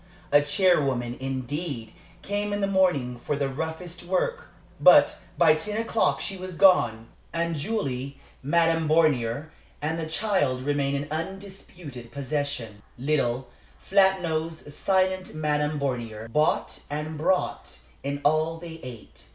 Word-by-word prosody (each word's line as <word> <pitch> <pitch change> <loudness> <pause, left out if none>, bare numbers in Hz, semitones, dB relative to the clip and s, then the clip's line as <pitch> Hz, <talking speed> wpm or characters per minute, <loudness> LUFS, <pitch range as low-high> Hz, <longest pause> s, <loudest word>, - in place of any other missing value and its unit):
A 145 - +7
charwoman, 140 -7 +2
indeed, 135 -2 -4 0.3
came 205 +1 -2
in 205 - -1
the - - +3
morning 180 -11 +1
for 145 - -1
the 140 -1 0
roughest 160 +5 -4
work, 190 - -1 0.3
but - - +7 0.2
by 165 -3 +6
ten 210 +7 -3
o'clock 225 0 +1
she 195 - -2
was 185 -1 -7
gone, 165 - +4 0.3
and 170 0 -1
Julie, 140 - -3 0.2
Madame 165 +2 +2
Bornier, 150 -3 +2 0.3
and 160 +2 -2
the 160 - -3
child 160 -10 0
remained 140 0 0
in 150 - -16
undisputed 170 -7 -7
possession. 140 -6 -3 0.2
Little, 130 -2 0 0.3
flat 190 -1 +3
nosed, 160 -2 -3
silent 185 0 0
Madame 150 -1 0
Bornier 115 -5 -3
bought 150 +1 +1
and 150 +2 -4
brought 175 +5 -1 0.2
in 140 +1 -3
all 155 +2 +2
they 165 -1 -9
ate. 120 -4 -10
155 Hz, 130 wpm, -26 LUFS, 135-180 Hz, 0.3 s, A